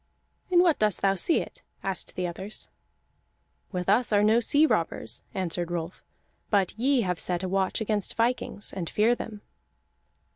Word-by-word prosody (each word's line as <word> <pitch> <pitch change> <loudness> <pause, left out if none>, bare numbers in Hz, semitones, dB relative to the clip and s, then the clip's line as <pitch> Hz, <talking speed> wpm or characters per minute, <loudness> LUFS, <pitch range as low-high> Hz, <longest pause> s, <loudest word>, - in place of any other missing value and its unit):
"In 355 -1 +5
what 335 -4 +3
dost 210 -3 +1
thou 195 -1 +4
see 195 - +2
it?" - - -10 0.2
asked 195 -1 -2
the 180 - -1
others. 190 +4 -5 1.0
"With 180 -2 -3
us 220 +5 +3
are 205 -1 +4
no 220 +2 +5
sea 290 +6 +4
robbers," 160 - -1
answered 175 -2 -2
Rolf, 170 0 -4 0.5
"but 200 -4 +2
ye 255 +3 +2
have 180 -4 -1
set 180 0 -1
a - - -1
watch 190 +2 0
against 210 -2 -1
vikings, 230 -3 -1
and 180 -4 -4
fear 220 +3 +3
them." 220 -3 -6
200 Hz, 160 wpm, -27 LUFS, 180-230 Hz, 1.0 s, In